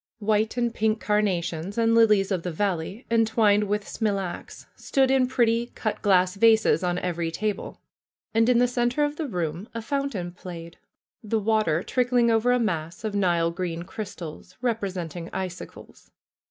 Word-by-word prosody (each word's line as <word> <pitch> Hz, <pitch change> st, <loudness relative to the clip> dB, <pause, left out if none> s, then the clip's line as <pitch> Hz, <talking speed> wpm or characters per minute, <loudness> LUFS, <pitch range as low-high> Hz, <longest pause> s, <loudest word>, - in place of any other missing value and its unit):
White 215 Hz, +1 st, 0 dB
and 240 Hz, -1 st, 0 dB
pink 220 Hz, -1 st, +1 dB
carnations 195 Hz, -3 st, -1 dB
and 230 Hz, 0 st, +3 dB
lilies 215 Hz, -4 st, +4 dB
of 185 Hz, -3 st, 0 dB
the 180 Hz, -, -4 dB
valley, 190 Hz, -, -2 dB
entwined 220 Hz, -2 st, +3 dB
with 205 Hz, 0 st, -2 dB
smilax, 200 Hz, -5 st, -3 dB
stood 265 Hz, -1 st, +1 dB
in 265 Hz, -1 st, +3 dB
pretty 235 Hz, -2 st, +1 dB
cut 215 Hz, -, -3 dB
glass 185 Hz, -3 st, +3 dB
vases 220 Hz, -1 st, +4 dB
on 175 Hz, 0 st, 0 dB
every 170 Hz, -2 st, -2 dB
table. 210 Hz, +5 st, -3 dB, 0.5 s
And 225 Hz, +2 st, +3 dB
in 250 Hz, -, +4 dB
the 245 Hz, +1 st, +4 dB
center 245 Hz, +3 st, 0 dB
of 290 Hz, 0 st, -1 dB
the 315 Hz, -, -3 dB
room 175 Hz, -, -3 dB
a 230 Hz, -, -3 dB
fountain 275 Hz, -10 st, -2 dB
played, 170 Hz, -2 st, -10 dB, 0.4 s
the 220 Hz, +1 st, 0 dB
water 210 Hz, -6 st, +1 dB
trickling 245 Hz, -2 st, +2 dB
over 225 Hz, +2 st, +3 dB
a 250 Hz, -, +4 dB
mass 170 Hz, -6 st, -2 dB
of 215 Hz, -2 st, -2 dB
nile 175 Hz, -4 st, +2 dB
green 170 Hz, -1 st, -4 dB
crystals, 185 Hz, -3 st, -8 dB
representing 185 Hz, -8 st, -3 dB
icicles. 185 Hz, -1 st, -7 dB
210 Hz, 155 wpm, -25 LUFS, 180-230 Hz, 0.5 s, lilies